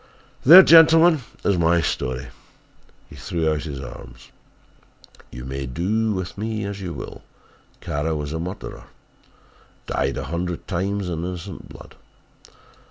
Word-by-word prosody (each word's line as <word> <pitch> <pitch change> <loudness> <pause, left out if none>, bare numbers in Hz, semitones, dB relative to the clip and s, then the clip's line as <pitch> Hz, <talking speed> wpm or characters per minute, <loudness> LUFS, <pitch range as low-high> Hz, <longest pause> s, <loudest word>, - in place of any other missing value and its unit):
"There, 175 +7 +10
gentlemen, 165 -1 +6 0.2
is 95 -3 +2
my 85 +1 +3
story!" 65 -4 -3 0.8
He - - -14
threw 85 -4 -2
out 75 -1 -2
his 70 -4 -6
arms. - - -11 1.0
"You 60 - -9
may 65 +1 -5
do 105 - -1
with 95 0 -5
me 110 0 -3
as 100 0 -6
you 90 -2 -5
will. - - -8 0.6
Kara 75 +2 -2
was 75 0 -4
a 80 - -3
murderer, 85 -8 -7 1.0
dyed 70 0 -2
a 65 - -3
hundred 85 +4 -4
times 100 +2 -2
in 85 -2 -3
innocent 90 0 -7
blood. - - -13
85 Hz, 135 wpm, -22 LUFS, 75-100 Hz, 1.0 s, There